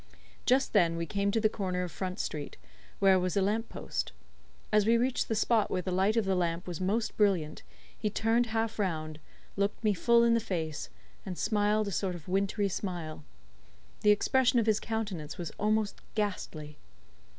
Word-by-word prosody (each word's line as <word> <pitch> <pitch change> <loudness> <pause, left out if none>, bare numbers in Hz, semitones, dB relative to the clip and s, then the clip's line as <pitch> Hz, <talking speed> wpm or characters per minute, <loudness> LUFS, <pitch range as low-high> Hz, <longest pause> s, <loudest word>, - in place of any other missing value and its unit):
Just 260 +2 +3
then 170 -5 +3
we 170 - -2
came 200 +4 0
to 225 - +1
the 220 - +4
corner 185 -4 -2
of 180 - -5
Front 185 +2 -4
Street, 150 -2 -4 0.4
where 190 -1 +5
was 180 +1 -1
a - - +4
lamp 220 +3 0
post. - - -4 0.6
As 210 0 +4
we 230 +1 +5
reached 250 +2 0
the 225 - 0
spot 220 -1 +2
where 180 - -1
the 185 - -3
light 195 +5 +2
of 225 - +2
the 190 - +1
lamp 175 -1 -1
was 175 -1 -5
most 215 +4 0
brilliant, 185 -8 +1 0.3
he 215 - -2
turned 225 +3 +1
half 225 0 -2
round, 155 -5 -2 0.4
looked 200 +3 -1
me 210 -1 +3
full 235 +5 +4
in 235 0 +4
the 230 - +4
face, 160 - -3 0.3
and 180 -2 -6
smiled 210 0 +1
a - - -2
sort 180 +2 -1
of 165 -3 -11
wintry 200 +2 +1
smile. 175 -5 -4 0.8
The 210 - +4
expression 250 +4 +3
of 230 - +3
his 215 -1 +3
countenance 205 -9 -4
was 170 -3 -5
almost 215 0 0
ghastly. 165 -8 -3
200 Hz, 185 wpm, -30 LUFS, 175-220 Hz, 0.8 s, where